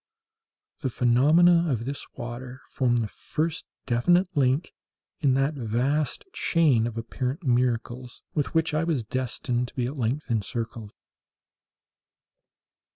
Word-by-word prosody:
The 130 - -1
phenomena 155 +9 +4
of 115 -3 -1
this 140 +2 -4
water 125 +2 -7
formed 120 -3 +1
the - - -2
first 155 +9 -3 0.2
definite 175 +10 +3
link 135 +3 +1 0.5
in 135 -5 +3
that 135 +3 +1
vast 135 +4 -1
chain 140 -10 +3
of 115 -1 -6
apparent 125 +7 -3
miracles 125 -1 -1
with 150 +2 -2
which 160 -1 +2
I 155 +1 +1
was 160 -8 0
destined 125 +1 -2
to - - -13
be 125 - 0
at 135 +4 -4
length 125 +4 -1
encircled. 115 0 -3
130 Hz, 125 wpm, -26 LUFS, 120-150 Hz, 0.5 s, phenomena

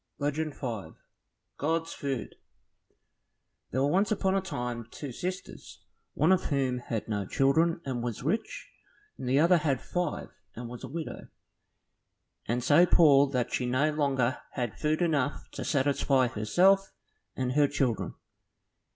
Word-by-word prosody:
Legend 150 +1 -2
5 110 - -5 0.6
God's 165 +3 -1
Food 135 -4 -4 1.4
There 130 +2 0
were - - +3
once 195 +4 +2
upon 195 -2 +1
a 195 - +2
time 125 -10 -4
two 145 +2 -7
sisters, 180 +8 -7 0.3
one 155 +5 +3
of 185 - +3
whom 130 -4 0
had 115 -3 -4
no 105 -2 -1
children 160 +5 +2
and 130 -3 -3
was 120 -1 -4
rich, 215 - -3 0.5
and 125 - -4
the 130 - +3
other 170 +4 +5
had 140 -5 0
five 175 -4 -3 0.3
and 120 +1 -6
was 120 +2 -9
a - - -5
widow, 160 +4 -6 1.2
and 120 +2 -1
so 155 +7 +5
poor 145 -5 +6
that 125 -3 -2
she 125 - 0
no 135 +5 +2
longer 135 -4 0
had 120 -5 -2
food 155 +3 +1
enough 145 -4 0
to - - -6
satisfy 135 -2 +2
herself 185 - +3 0.4
and 130 -1 -1
her 145 +2 +4
children. 135 -5 -1
140 Hz, 145 wpm, -29 LUFS, 125-165 Hz, 1.4 s, poor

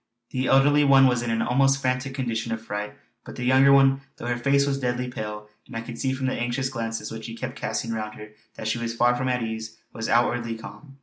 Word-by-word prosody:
The 130 -1 -1
elderly 145 +2 +5
one 135 -1 +6
was 125 -2 +3
in 120 - -3
an 115 0 +1
almost 135 +2 +3
frantic 130 +1 -1
condition 115 -3 -2
of 115 - -2
fright; 105 -1 -5 0.3
but - - -10
the 125 - -5
younger 130 +2 +5
one, 135 0 +5 0.2
though - - -8
her 120 0 0
face 140 +3 +2
was 140 -1 -1
deadly 125 -1 -1
pale 105 -3 -6 0.2
and - - -11
I - - -3
could 115 0 -8
see 130 - 0
from 130 0 -2
the 130 - 0
anxious 120 +2 -1
glances 115 -3 -4
which 110 -1 -7
she 115 - -6
kept 130 +2 -5
casting 115 - -3
round 110 -1 -4
her 105 0 -10 0.3
that 110 - -5
she 110 +2 0
was 115 0 -3
far 120 +1 +3
from 130 +1 -1
at 125 -1 0
ease 110 -1 -5 0.2
was 115 -1 -4
outwardly 120 -1 +1
calm. 135 +5 -12
120 Hz, 245 wpm, -25 LUFS, 115-135 Hz, 0.3 s, one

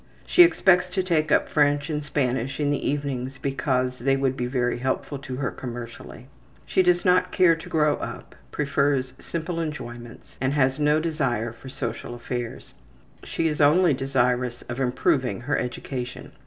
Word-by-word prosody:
She 360 - +5
expects 190 - +5
to 185 +1 -1
take 155 -4 +1
up - - +4
French 145 -1 +2
and 150 -1 -2
Spanish 135 -2 -1
in 145 -1 +1
the 145 - -1
evenings 135 -2 -3
because 130 -2 -1
they 135 +3 +2
would 135 -1 0
be 125 -2 -2
very 125 -1 0
helpful 130 +2 -2
to 130 -2 -6
her 135 0 -2
commercially. 120 0 -8 0.4
She - - +2
does 180 -1 +2
not 180 0 +3
care 180 -3 +5
to 165 - -10
grow 150 -2 +2
up, - - -7 0.2
prefers 140 -3 0
simple 170 +1 -4
enjoyments, 120 -7 -7
and 130 +1 +1
has 135 -1 +2
no 150 +1 +3
desire 125 -8 -1
for 125 +3 -11
social 120 -2 -5
affairs. 120 0 -6 0.5
She 165 - -1
is 150 -1 -1
only 155 +3 +5
desirous 125 -2 0
of 120 +2 -6
improving 130 - +1
her 145 +4 -1
education. 125 0 -5
135 Hz, 165 wpm, -25 LUFS, 125-150 Hz, 0.5 s, She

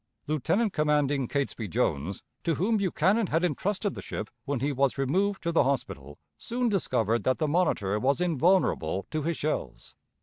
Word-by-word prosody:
Lieutenant 170 - 0
commanding 145 -3 +1
Catesby 135 -5 -2
Jones, 80 +1 -1 0.2
to 165 -2 +1
whom 215 +5 +1
Buchanan 195 +2 +2
had 165 +2 0
intrusted 190 +5 -1
the - - -7
ship 105 - -6
when 140 -2 -1
he 140 +4 0
was 140 0 +1
removed 190 +9 0
to 170 - 0
the 165 - +4
hospital, 75 - -3 0.2
soon 240 +1 -1
discovered 115 - 0
that 130 - +2
the 155 - 0
Monitor 145 - +1
was 135 +6 +1
invulnerable 165 - +2
to 155 - -1
his 165 +2 -2
shells. 145 - -4
150 Hz, 165 wpm, -28 LUFS, 130-180 Hz, 0.2 s, the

